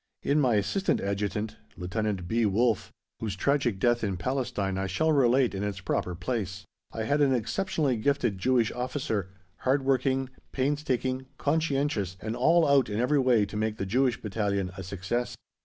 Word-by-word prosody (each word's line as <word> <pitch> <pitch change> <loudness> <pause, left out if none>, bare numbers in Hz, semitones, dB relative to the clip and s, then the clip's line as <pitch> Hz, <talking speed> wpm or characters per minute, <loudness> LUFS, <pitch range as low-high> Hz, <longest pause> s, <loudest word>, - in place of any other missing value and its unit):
In 145 +2 +2
my 125 -6 +3
Assistant 190 - +1
Adjutant, 105 +2 -2 0.2
Lt. 95 0 -2
B. 115 +4 +1
Wolffe 110 +1 +2 0.3
(whose 105 -3 -3
tragic 130 -1 +1
death 120 +4 +2
in 100 -3 -1
Palestine 105 -3 -1
I 95 - -1
shall 160 - +1
relate 130 -4 +3
in 95 - -3
its 100 -2 -3
proper 90 0 -2
place), 95 -2 -3 0.3
I 110 - -3
had 145 +6 +1
an 135 -2 +4
exceptionally 145 - 0
gifted 120 -4 0
Jewish 120 +1 +2
officer, 125 -6 -2 0.3
hardworking, 135 0 +1 0.2
painstaking, 130 -2 -1
conscientious, 140 - 0
and 110 +3 -4
all 165 +6 +4
out 140 -4 +4
in 105 +1 -2
every 140 +4 +3
way 125 -5 +4
to 100 - -9
make 110 0 -1
the 95 - -2
Jewish 125 +4 +1
Battalion 100 -3 -1
a 95 - -6
success. 100 +6 -3
120 Hz, 160 wpm, -28 LUFS, 100-135 Hz, 0.3 s, an